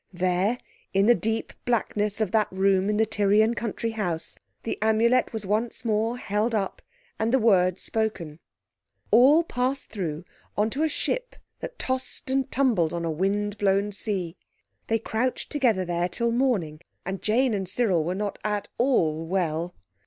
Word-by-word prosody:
There 185 Hz, +5 st, +1 dB, 0.4 s
in 195 Hz, +1 st, +4 dB
the 240 Hz, -, +7 dB
deep 225 Hz, -1 st, -2 dB
blackness 210 Hz, -3 st, 0 dB
of 210 Hz, -4 st, 0 dB
that 215 Hz, -2 st, +3 dB
room 190 Hz, +1 st, +2 dB
in 210 Hz, -, +1 dB
the 220 Hz, -, +4 dB
Tyrian 215 Hz, +1 st, +3 dB
country 230 Hz, 0 st, -3 dB
house 180 Hz, -7 st, -3 dB, 0.3 s
the 230 Hz, -, -3 dB
Amulet 230 Hz, +3 st, +3 dB
was 220 Hz, -3 st, -5 dB
once 220 Hz, +3 st, -1 dB
more 225 Hz, +2 st, 0 dB
held 215 Hz, +1 st, -1 dB
up 195 Hz, -3 st, -2 dB, 0.4 s
and 220 Hz, +1 st, +1 dB
the 265 Hz, -, +5 dB
word 185 Hz, -6 st, +3 dB
spoken. 190 Hz, -9 st, -2 dB, 0.7 s
All 270 Hz, +9 st, +6 dB
passed 260 Hz, -2 st, -2 dB
through 175 Hz, -6 st, -4 dB, 0.3 s
on 215 Hz, +2 st, +2 dB
to 280 Hz, -, -2 dB
a 320 Hz, -, +2 dB
ship -, -, -2 dB, 0.2 s
that -, -, -7 dB
tossed 260 Hz, 0 st, -3 dB
and 270 Hz, -1 st, +1 dB
tumbled 220 Hz, -, +2 dB
on 170 Hz, -1 st, -2 dB
a 165 Hz, -, -1 dB
wind 205 Hz, +5 st, -1 dB
blown 200 Hz, +1 st, +2 dB
sea. 195 Hz, -4 st, -3 dB, 0.5 s
They 225 Hz, -, +2 dB
crouched 230 Hz, +3 st, -2 dB
together 235 Hz, -10 st, +2 dB
there 175 Hz, 0 st, -1 dB
till 235 Hz, +5 st, -1 dB
morning, 215 Hz, -, 0 dB, 0.2 s
and 190 Hz, +1 st, -4 dB
Jane 240 Hz, +3 st, +2 dB
and 190 Hz, -3 st, -2 dB
Cyril 195 Hz, -6 st, +2 dB
were 175 Hz, +3 st, -2 dB
not 205 Hz, +1 st, -3 dB
at 210 Hz, -1 st, -2 dB
all 165 Hz, -, +2 dB
well. 170 Hz, -1 st, -1 dB
210 Hz, 165 wpm, -26 LUFS, 185-235 Hz, 0.7 s, the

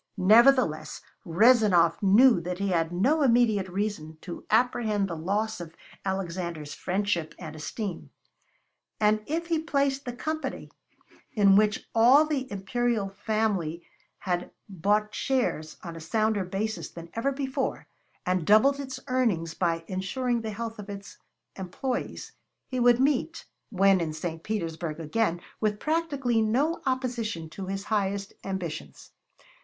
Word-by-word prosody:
Nevertheless, 210 Hz, -, +4 dB, 0.2 s
Rezanov 190 Hz, -3 st, +4 dB
knew 210 Hz, +1 st, +6 dB
that 180 Hz, +1 st, -4 dB
he 200 Hz, +1 st, -1 dB
had 165 Hz, -2 st, +1 dB
no 255 Hz, -, +2 dB
immediate 230 Hz, -7 st, +3 dB
reason 180 Hz, -5 st, -3 dB
to 175 Hz, -, -8 dB
apprehend 220 Hz, -3 st, +2 dB
the 170 Hz, -, -4 dB
loss 205 Hz, +5 st, -2 dB
of 165 Hz, -1 st, -9 dB, 0.3 s
Alexander's 175 Hz, -5 st, -3 dB
friendship 185 Hz, -4 st, -2 dB
and 155 Hz, -3 st, -8 dB
esteem; 180 Hz, +4 st, -5 dB, 0.9 s
and 215 Hz, 0 st, +3 dB
if 330 Hz, +3 st, -2 dB
he 335 Hz, -1 st, 0 dB
placed 280 Hz, -3 st, 0 dB
the 245 Hz, -, -4 dB
Company, 310 Hz, +5 st, -4 dB, 0.6 s
in 200 Hz, -2 st, +5 dB
which 210 Hz, +1 st, +2 dB
all 250 Hz, +7 st, +6 dB
the 280 Hz, -4 st, -3 dB
imperial 205 Hz, +1 st, -1 dB
family 195 Hz, -5 st, -1 dB, 0.3 s
had 180 Hz, -2 st, -2 dB, 0.2 s
bought 205 Hz, +3 st, 0 dB
shares, 235 Hz, -, -1 dB
on 170 Hz, -2 st, -7 dB
a -, -, -7 dB
sounder 215 Hz, +4 st, 0 dB
basis 210 Hz, +4 st, -3 dB
than 170 Hz, 0 st, -11 dB
ever 230 Hz, +5 st, 0 dB
before, 265 Hz, -1 st, -3 dB, 0.4 s
and 185 Hz, -1 st, +1 dB
doubled 270 Hz, +7 st, +5 dB
its 265 Hz, -2 st, -5 dB
earnings 220 Hz, -11 st, 0 dB
by 165 Hz, -2 st, -1 dB
insuring 235 Hz, +6 st, -1 dB
the 220 Hz, -, -4 dB
health 225 Hz, +1 st, -5 dB
of 205 Hz, 0 st, -8 dB
its 200 Hz, -1 st, -9 dB, 0.4 s
employees, 200 Hz, +7 st, -4 dB, 0.4 s
he 255 Hz, -, -3 dB
would 245 Hz, 0 st, +5 dB
meet, 290 Hz, +5 st, 0 dB, 0.2 s
when 195 Hz, -2 st, +4 dB
in 160 Hz, -2 st, -2 dB
St. 160 Hz, +1 st, -5 dB
Petersburg 165 Hz, -6 st, -3 dB
again, 175 Hz, +2 st, 0 dB, 0.2 s
with 210 Hz, -1 st, 0 dB
practically 285 Hz, -7 st, 0 dB
no 270 Hz, +10 st, +1 dB
opposition 235 Hz, -10 st, -2 dB
to 190 Hz, +3 st, -7 dB
his 195 Hz, +1 st, -3 dB
highest 200 Hz, -2 st, -1 dB
ambitions. 185 Hz, -5 st, -6 dB
205 Hz, 135 wpm, -27 LUFS, 175-245 Hz, 0.9 s, knew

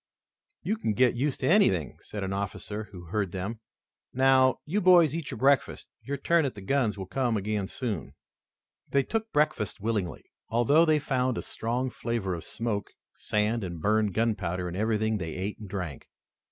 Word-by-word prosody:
"You 215 Hz, -, 0 dB
can 110 Hz, -, -1 dB
get 125 Hz, +2 st, +4 dB
used 135 Hz, +3 st, -1 dB
to 130 Hz, -, +1 dB
anything," 95 Hz, -, +3 dB
said 105 Hz, -2 st, -6 dB
an 95 Hz, 0 st, -2 dB
officer 100 Hz, +2 st, -4 dB
who 95 Hz, -4 st, -11 dB
heard 95 Hz, +2 st, -2 dB
them. 100 Hz, +5 st, -4 dB, 0.5 s
"Now, 130 Hz, 0 st, +4 dB
you 195 Hz, +8 st, 0 dB
boys 175 Hz, -5 st, +6 dB
eat 165 Hz, -3 st, -4 dB
your -, -, -5 dB
breakfasts. 140 Hz, +1 st, +2 dB, 0.2 s
Your 140 Hz, +1 st, -4 dB
turn 170 Hz, +4 st, +3 dB
at 135 Hz, -5 st, -2 dB
the 100 Hz, -, -8 dB
guns 110 Hz, 0 st, +1 dB
will 95 Hz, -, -5 dB
come 120 Hz, +2 st, 0 dB
again 105 Hz, -1 st, -2 dB
soon." 110 Hz, -, -4 dB, 0.7 s
They 140 Hz, -1 st, +3 dB
took 225 Hz, +5 st, -3 dB
breakfast 150 Hz, -9 st, +1 dB
willingly, 105 Hz, -4 st, -2 dB, 0.3 s
although 130 Hz, +8 st, +4 dB
they 155 Hz, -1 st, +4 dB
found 130 Hz, -4 st, 0 dB
a -, -, -3 dB
strong 125 Hz, +3 st, -2 dB
flavor 115 Hz, -7 st, -2 dB
of 85 Hz, -, -6 dB
smoke, 110 Hz, -3 st, -3 dB, 0.2 s
sand, 105 Hz, +2 st, 0 dB
and 85 Hz, -3 st, -5 dB
burned 105 Hz, +1 st, +1 dB
gunpowder 95 Hz, -6 st, 0 dB
in 90 Hz, -, -5 dB
everything 110 Hz, +1 st, +1 dB
they 80 Hz, -3 st, -4 dB
ate 95 Hz, +3 st, -4 dB
and 105 Hz, -3 st, -9 dB
drank. 90 Hz, -8 st, -5 dB
110 Hz, 180 wpm, -28 LUFS, 100-135 Hz, 0.7 s, boys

